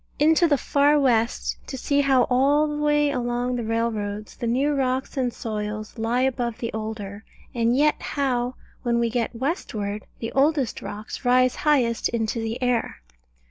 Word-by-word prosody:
Into 320 +3 +4
the 290 -3 +3
far 290 +2 +3
west, 235 -4 +1
to 265 - -5
see 285 +2 +1
how 265 -3 +4
all 280 +5 +3
the 295 0 -3
way 295 -1 +3
along 245 -1 -1
the 240 - -2
railroads 215 -2 -2
the 240 - -4
new 270 +5 +1
rocks 265 -1 -1
and 255 -3 0
soils 215 0 -5
lie 230 +3 +1
above 245 -3 -1
the 230 - -4
older, 215 -2 -5 0.3
and 235 +1 +2
yet 300 +1 +3
how, 255 -3 -1 0.3
when 240 -2 +1
we 235 -1 +1
get 235 0 -1
westward, 220 - -3
the 225 - -5
oldest 275 -2 +1
rocks 210 +5 -7
rise 255 0 +3
highest 255 -7 +2
into 230 0 -1
the 225 +2 -3
air. 240 - -1
245 Hz, 165 wpm, -24 LUFS, 225-275 Hz, 0.3 s, Into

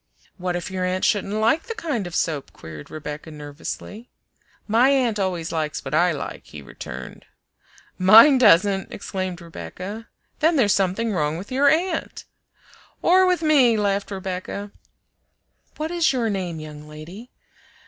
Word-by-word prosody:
"What 180 -1 -2
if 175 +1 -4
your 185 -1 -2
aunt 185 +1 0
shouldn't 205 -1 0
like 225 - +1
the 460 - -4
kind 290 - -3
of 175 - -7
soap?" 150 -4 -1
queried 75 -2 -11
Rebecca 150 +1 -7
nervously. 155 +9 -8 0.6
"My 230 +5 +4
aunt 250 -6 +2
always 180 -4 -2
likes 155 -2 -3
what - - -5
I 175 +3 +4
like," 155 - -6
he 75 -2 -10
returned 65 0 -9 0.7
"Mine 225 +9 +8
doesn't!" 195 -3 +4
exclaimed 185 -3 -5
Rebecca 185 +6 -8 0.3
"Then 320 +2 +3
there's 215 -8 +4
something 200 +4 0
wrong 150 -3 0
with 195 +8 -9
your 280 +2 +4
aunt!" 330 +2 -1 0.8
"Or 370 +1 +5
with 360 -2 +1
me," 270 -7 +4
laughed 200 -1 0
Rebecca. 195 +1 -5 1.1
"What 310 +2 -3
is 340 -5 +2
your 235 -4 0
name, 180 -5 -3
young 150 -1 -10
lady?" 170 +10 -10
195 Hz, 150 wpm, -23 LUFS, 170-245 Hz, 1.1 s, Mine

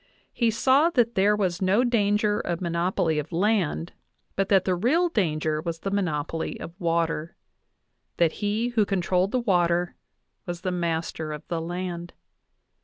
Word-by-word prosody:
He 235 -2 +2
saw 265 +8 +4
that 240 -7 +2
there 205 +2 +3
was 185 -4 -1
no 195 +6 +3
danger 210 -3 +2
of 175 -5 -2
monopoly 170 -2 0
of 150 +3 -6
land, 180 -3 0 0.4
but 195 0 0
that 195 -2 +4
the 185 - +2
real 280 - +2
danger 155 - 0
was 165 0 -5
the 195 - -3
monopoly 165 -5 -2
of 165 - -8
water 165 -1 -1 0.8
that 170 -2 +3
he 210 +4 0
who 235 -3 +2
controlled 185 -1 +1
the 255 - +1
water 175 -5 +1 0.5
was 175 -1 -5
the 185 -1 -2
master 165 -2 -2
of 150 -1 -8
the 170 -2 -2
land. 175 0 -5
180 Hz, 155 wpm, -25 LUFS, 170-210 Hz, 0.8 s, saw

